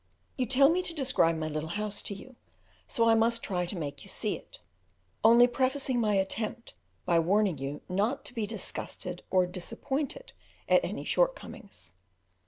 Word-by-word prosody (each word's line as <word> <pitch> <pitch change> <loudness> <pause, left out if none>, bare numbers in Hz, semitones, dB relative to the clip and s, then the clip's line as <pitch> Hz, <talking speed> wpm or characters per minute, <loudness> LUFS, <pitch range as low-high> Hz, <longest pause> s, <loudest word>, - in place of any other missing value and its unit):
You 255 -2 -1
tell 275 +2 +6
me 350 +3 +2
to 340 -2 -4
describe 255 - +2
my 155 0 -2
little 155 +1 -3
house 210 +3 -2
to 200 - -2
you, 255 +6 -12 0.5
so 230 -1 +2
I 225 - +6
must 230 +1 +2
try 180 -3 -1
to 185 - -5
make 145 -4 -5
you - - -13
see - - -1
it, - - -12 0.6
only 235 +2 +8
prefacing 260 +1 0
my 210 -3 +2
attempt 215 +4 -2 0.3
by 170 -1 +4
warning 185 -1 +2
you 140 +2 -4
not 205 +8 0
to - - -9
be 225 -4 -2
disgusted 180 -4 -5
or 185 -1 +4
disappointed 265 - -4 0.3
at - - +5
any - - -4
shortcomings. 235 - -2
220 Hz, 170 wpm, -29 LUFS, 180-255 Hz, 0.6 s, only